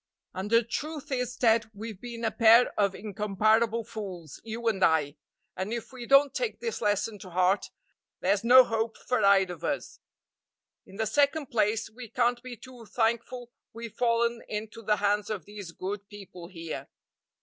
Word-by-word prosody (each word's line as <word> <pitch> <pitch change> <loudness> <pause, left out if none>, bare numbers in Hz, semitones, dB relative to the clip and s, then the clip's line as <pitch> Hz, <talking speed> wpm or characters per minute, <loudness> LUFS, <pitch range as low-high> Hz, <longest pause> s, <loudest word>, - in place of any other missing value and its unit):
And 190 +2 -4
the 230 +1 +4
truth 290 +6 -5
is, 250 -2 -2
Ted, 225 -2 +3
we've 215 -1 -8
been 235 -1 -6
a 220 - +1
pair 230 +1 +5
of 200 -2 +1
incomparable 215 +3 +1
fools, 185 -9 -8
you 230 +1 -5
and 195 -4 +1
I, 150 -2 +2 0.4
and 190 +3 -4
if 235 +2 -5
we 245 -2 -8
don't 275 0 +5
take - - -2
this 465 -1 -4
lesson 210 +1 0
to 185 - -10
heart, 185 +3 +1 0.5
there's 195 +2 +1
no 255 +2 +8
hope 225 -1 -2
for 250 -3 -1
either 195 -2 +4
of 170 - -13
us. - - -3 0.9
In 190 - -14
the 220 +2 -1
second 285 +5 +1
place, 220 -1 +1
we 235 0 -11
can't 240 +1 +1
be 250 -1 -8
too 245 -3 -13
thankful 235 +2 -1 0.2
we've 230 -1 -8
fallen 235 -1 +1
into 215 +1 -5
the 210 -1 +2
hands 205 0 0
of 200 -7 -4
these 205 -4 -9
good 200 +3 -6
people 190 -4 -11
here. 165 -3 -7
220 Hz, 170 wpm, -28 LUFS, 200-235 Hz, 0.9 s, no